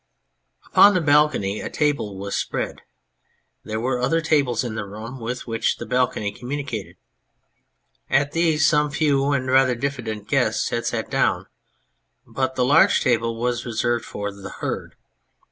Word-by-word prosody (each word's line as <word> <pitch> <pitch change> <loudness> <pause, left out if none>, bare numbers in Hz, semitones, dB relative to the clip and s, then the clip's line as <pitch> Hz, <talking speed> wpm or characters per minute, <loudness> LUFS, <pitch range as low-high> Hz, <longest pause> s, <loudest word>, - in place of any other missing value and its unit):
Upon 205 0 +6
the 180 - +2
balcony 145 -9 +2
a - - -5
table 140 -10 -1
was 100 +1 -4
spread; - - -3 0.8
there 110 0 -4
were 125 +2 -1
other 165 +6 +2
tables 140 -7 +1
in 120 -3 -4
the 105 -2 -4
room 110 +6 -8
with 120 +2 -5
which 115 -1 -1
the - - -6
balcony 125 -5 0
communicated. 120 - -5 1.1
At 145 +1 +2
these 160 -2 +2
some 150 -1 +3
few 145 -2 +1
and 135 -2 0
rather 130 -1 +3
diffi 135 +1 -3
dent 105 -2 -5
guests - - +1
had - - -2
sat - - -3
down; - - +1 0.8
but 130 0 -2
the 125 - +2
large 145 +5 +5
table 115 -3 0
was 120 0 -1
reserved 120 0 -1
for 100 0 -5
the 100 -1 -9
Herd. - - -5
125 Hz, 155 wpm, -22 LUFS, 110-145 Hz, 1.1 s, Upon